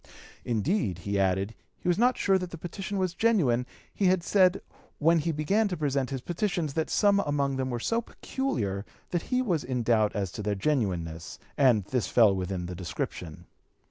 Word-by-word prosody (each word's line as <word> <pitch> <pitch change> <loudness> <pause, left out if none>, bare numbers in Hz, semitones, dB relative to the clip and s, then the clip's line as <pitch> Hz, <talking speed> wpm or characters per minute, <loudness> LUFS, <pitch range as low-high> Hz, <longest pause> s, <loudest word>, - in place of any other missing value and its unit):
Indeed, 120 - 0
he 100 0 0
added, 95 +2 +1 0.2
he - - -7
was 175 +2 +2
not 250 +1 +3
sure 195 -1 +3
that 180 -1 -5
the 170 - -8
petition 195 +5 -5
was 185 -2 0
genuine; 150 - +2 0.3
he 200 - 0
had 185 -2 +3
said, 190 -1 +3 0.3
when 165 +2 +4
he 165 +2 0
began 195 +9 +1
to 180 -3 -3
present 140 -3 0
his 135 -2 -4
petitions, 175 - -2
that 160 +1 -1
some 200 -1 +3
among 140 -5 0
them 130 0 -1
were 120 -1 -2
so 230 - 0
peculiar 115 - -3 0.3
that 175 - 0
he 255 0 +2
was 175 - 0
in 125 -1 -2
doubt 110 -2 +2
as 100 -3 -2
to 105 - -6
their 105 0 -1
genuineness, 95 - -2 0.2
and 120 -8 +4
this 125 +2 -1
fell 110 -5 +5
within 95 -1 -3
the 90 - -5
description. 85 -2 -5
140 Hz, 190 wpm, -28 LUFS, -, 0.3 s, fell